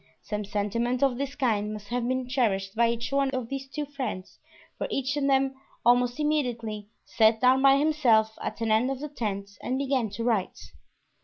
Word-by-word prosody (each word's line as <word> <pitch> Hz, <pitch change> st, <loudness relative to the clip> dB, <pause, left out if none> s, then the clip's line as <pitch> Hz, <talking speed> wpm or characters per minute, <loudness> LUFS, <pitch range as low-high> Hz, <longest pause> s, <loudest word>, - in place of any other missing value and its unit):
Some 210 Hz, -1 st, -4 dB
sentiment 230 Hz, +5 st, -1 dB
of 265 Hz, -2 st, +2 dB
this 280 Hz, 0 st, -3 dB
kind 215 Hz, -7 st, 0 dB
must 210 Hz, -1 st, -9 dB
have 240 Hz, 0 st, -1 dB
been 255 Hz, 0 st, -1 dB
cherished 205 Hz, -7 st, 0 dB
by 235 Hz, +1 st, +3 dB
each 230 Hz, -1 st, -3 dB
one 275 Hz, 0 st, +2 dB
of 250 Hz, -3 st, -3 dB
these 275 Hz, 0 st, -5 dB
two 295 Hz, +3 st, -4 dB
friends, 255 Hz, -10 st, -6 dB, 0.4 s
for -, -, -1 dB
each 275 Hz, +1 st, -1 dB
of 285 Hz, -1 st, 0 dB
them 270 Hz, 0 st, +2 dB, 0.3 s
almost 245 Hz, +2 st, +3 dB
immediately 235 Hz, -9 st, -1 dB, 0.2 s
sat 220 Hz, 0 st, +3 dB
down 255 Hz, +2 st, +4 dB
by 275 Hz, 0 st, +6 dB
himself 250 Hz, -8 st, +3 dB
at -, -, -5 dB
an 225 Hz, -1 st, 0 dB
end 225 Hz, +4 st, +3 dB
of 270 Hz, -1 st, -3 dB
the 300 Hz, +1 st, -5 dB
tent 200 Hz, -7 st, -4 dB
and 255 Hz, -, -2 dB
began 265 Hz, -4 st, 0 dB
to 220 Hz, +3 st, -5 dB
write. 225 Hz, -6 st, 0 dB
245 Hz, 190 wpm, -27 LUFS, 220-270 Hz, 0.4 s, by